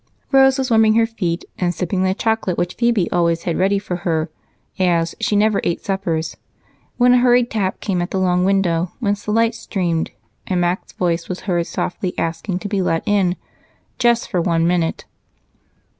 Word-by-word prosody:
Rose 270 0 +5
was 265 -2 -2
warming 220 -1 +5
her 230 0 +4
feet 185 -7 -3
and 175 -1 0
sipping 185 +1 -1
the 190 0 +1
chocolate 220 -5 -1
which 175 0 -1
Phebe 235 -7 +1
always 170 -1 +1
had 170 - -1
ready 195 +2 +2
for 195 -3 -4
her, 165 -2 -1 0.5
as 170 -2 +2
she 225 -2 0
never 210 0 +3
ate 170 - -2
supper, 190 -5 -1 0.8
when 245 0 +5
a 250 - +5
hurried 245 -1 +3
tap 195 -4 -1
came 185 -4 -1
at 175 - -3
the - - -2
long 180 -1 +2
window 180 -3 +1
whence 205 -3 -1
the 210 - -2
light 230 +1 +2
streamed 180 -7 -2 0.4
and 185 -2 0
Mac's 175 +1 -1
voice 170 -2 -1
was 185 - -4
heard 175 -3 -1
softly 180 0 -3
asking 165 +3 -2
to 195 - -5
be 200 -1 -1
let 165 -2 0
in 195 -4 +2 0.6
"just 235 -1 +2
for 180 - 0
one 165 -1 +1
minute." 170 -1 0
185 Hz, 185 wpm, -19 LUFS, 175-220 Hz, 0.8 s, Rose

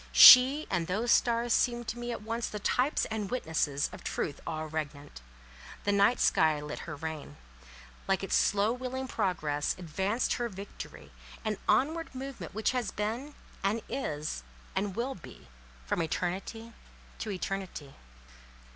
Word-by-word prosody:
She 270 +4 +10
and 175 -4 0
those 220 +6 0
stars 235 -1 +3
seemed 240 -2 +1
to 240 - -4
me 240 0 -3
at 230 - -5
once 230 +2 -2
the 210 - -5
types 250 +7 +1
and 215 -3 -2
witnesses 155 - 0
of - - -10
truth 145 - -3
all 155 -1 -3
regnant. 145 - -6 0.6
The 205 - +1
night 200 +4 +4
sky 155 -2 +3
lit 150 0 -6
her 150 - -4
reign: 155 - -6 0.7
like 195 0 +1
its 195 - -3
slow 205 +3 +3
wheeling 260 +1 -4
progress, 150 - -1
advanced 190 +7 -1
her 240 -1 -2
victory—that 205 +1 -8
onward 305 +8 +1
movement 265 -6 -7
which 220 - +1
has 250 -4 -1
been, 235 +8 -3 0.3
and 210 +3 0
is, 150 - -3 0.3
and 195 0 -1
will 250 +4 -1
be 170 - -13 0.4
from 170 - 0
eternity 190 +7 -3 0.5
to 220 - -4
eternity. 190 -7 -4
205 Hz, 145 wpm, -30 LUFS, 160-240 Hz, 0.7 s, She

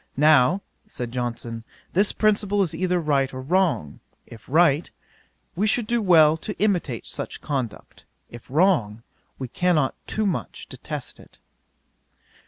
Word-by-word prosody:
Now 150 +5 +4 0.2
(said 120 -1 -6
Johnson,) 120 -2 -4 0.3
this 200 +3 +3
principle 205 -1 +1
is 170 - -2
either 180 +2 0
right 140 -4 +1
or 130 - -7
wrong; 165 - 0 0.3
if 115 -2 -13
right, 155 0 +3 0.7
we 205 +5 +1
should 230 +1 +2
do 235 +1 0
well 160 -5 +5
to 210 +6 -7
imitate 175 - 0
such - - -6
conduct; 130 -7 -5 0.2
if 120 +1 -13
wrong, 130 - +2 0.3
we 130 - -5
cannot 155 -1 +1
too 215 - -1
much 190 -5 -3
detest - - -7
it." - - -17
155 Hz, 135 wpm, -24 LUFS, 130-190 Hz, 0.7 s, well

